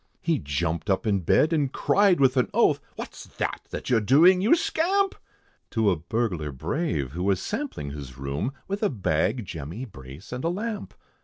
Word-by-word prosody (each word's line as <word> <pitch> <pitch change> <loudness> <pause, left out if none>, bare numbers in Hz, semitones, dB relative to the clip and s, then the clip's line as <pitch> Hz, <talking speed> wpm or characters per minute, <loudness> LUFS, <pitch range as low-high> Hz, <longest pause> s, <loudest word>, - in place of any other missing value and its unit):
He 170 -3 +1
jumped 80 +5 -2
up 95 +2 +1
in 100 -3 +2
bed, 150 - +3
and 150 -3 +2
he - - -3
cried 195 +5 +3
with 135 -1 +4
an 125 -6 +2
oath, - - +4
"What's - - -8
that, - - -2
that - - -5
you're 115 -3 +4
doing, 165 - +6
you 220 - +5
scamp?" 380 +4 +1 0.6
To 110 -3 +2
a - - +2
burglar 85 -3 -2
brave, 75 - -2
who 85 +4 -5
was 95 -1 +2
sampling 210 - -4
his 70 -4 -8
room, 70 - -2 0.2
With 200 +2 -3
a 210 - +3
bag, 105 - 0
jemmy, 85 - -6
brace, 70 - -12
and 125 +1 -4
a 165 - +1
lamp. 210 +3 -4
110 Hz, 185 wpm, -26 LUFS, -, 0.6 s, doing